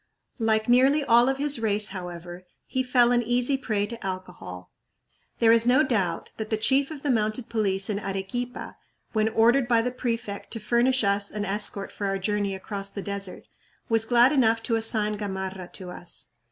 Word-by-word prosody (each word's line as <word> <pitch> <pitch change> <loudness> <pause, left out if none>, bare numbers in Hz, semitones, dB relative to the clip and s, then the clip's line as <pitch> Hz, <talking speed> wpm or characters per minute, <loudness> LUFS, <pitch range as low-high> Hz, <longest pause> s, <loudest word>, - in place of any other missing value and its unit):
Like 220 0 +1
nearly 265 +5 +4
all 240 -1 +5
of 270 - -1
his 285 -2 +2
race, 210 -1 +1
however, 175 -1 -8 0.2
he 260 - -1
fell 250 -1 +3
an 240 0 +3
easy 245 +3 +1
prey 215 -6 -1
to 230 +2 -8
alcohol. 140 - -7 0.7
There 225 -1 +4
is 230 0 +5
no 260 +5 +5
doubt 210 - -1
that 220 -1 -5
the 220 - 0
chief 270 +5 +2
of 305 -3 -9
the 285 - +1
mounted 220 +1 -1
police 195 -4 +1
in 205 -2 -1
Arequipa, 195 +6 -5 0.4
when 215 0 +2
ordered 240 +4 +3
by 230 -2 +3
the 250 - -1
prefect 230 -4 -4
to 225 - -4
furnish 240 +4 +2
us 200 0 +1
an 210 -1 -4
escort 200 0 -2
for 200 - -4
our 195 0 -1
journey 200 0 -1
across 195 +1 -4
the 200 0 -6
desert, 200 -2 -4 0.5
was 225 -1 +3
glad 245 +2 +5
enough 230 -5 +2
to 230 - 0
assign 215 -2 0
Gamarra 190 -2 -5
to 180 -2 -8
us. 175 -1 -10
220 Hz, 185 wpm, -26 LUFS, 200-245 Hz, 0.7 s, all